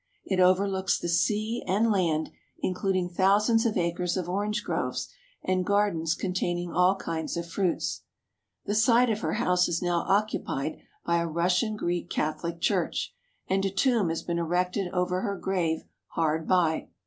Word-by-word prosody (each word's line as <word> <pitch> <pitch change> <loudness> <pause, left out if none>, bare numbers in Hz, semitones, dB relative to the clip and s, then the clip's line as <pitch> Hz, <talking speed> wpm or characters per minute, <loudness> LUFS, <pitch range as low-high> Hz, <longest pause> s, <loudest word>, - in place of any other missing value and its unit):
It 190 -2 -1
overlooks 190 +1 +3
the - - -4
sea 215 +7 0
and 210 +5 +2
land, 165 -6 +1 0.3
including 185 -1 -1
thou 190 +3 +4
sands 225 +2 +2
of 215 - -1
acres 175 +1 0
of 180 -2 -2
orange 205 +4 -1
groves - - -2 0.4
and 185 0 +1
gardens 185 -5 +1
containing 175 -2 -2
all 180 +2 +4
kinds 165 -4 -4
of 170 0 -4
fruits. 180 +1 -1 0.6
The 205 - -1
site 230 +2 +4
of 215 - -1
her - - -2
house 180 -4 +2
is 170 - -1
now 175 -1 +1
occupied 195 -8 0 0.3
by 170 0 +2
a 170 - -1
Russian 180 +7 +1
Greek 175 -3 -2
Catholic 170 +2 -2
Church - - 0 0.3
and 195 +1 +1
a 195 - +1
tomb 220 -2 +2
has 165 - -3
been 170 -1 -2
erected 180 +2 -1
over 180 0 0
her 200 -3 -2
grave 175 -4 -1 0.2
hard 160 0 -1
by. 170 -4 +2
180 Hz, 160 wpm, -27 LUFS, 170-200 Hz, 0.6 s, thou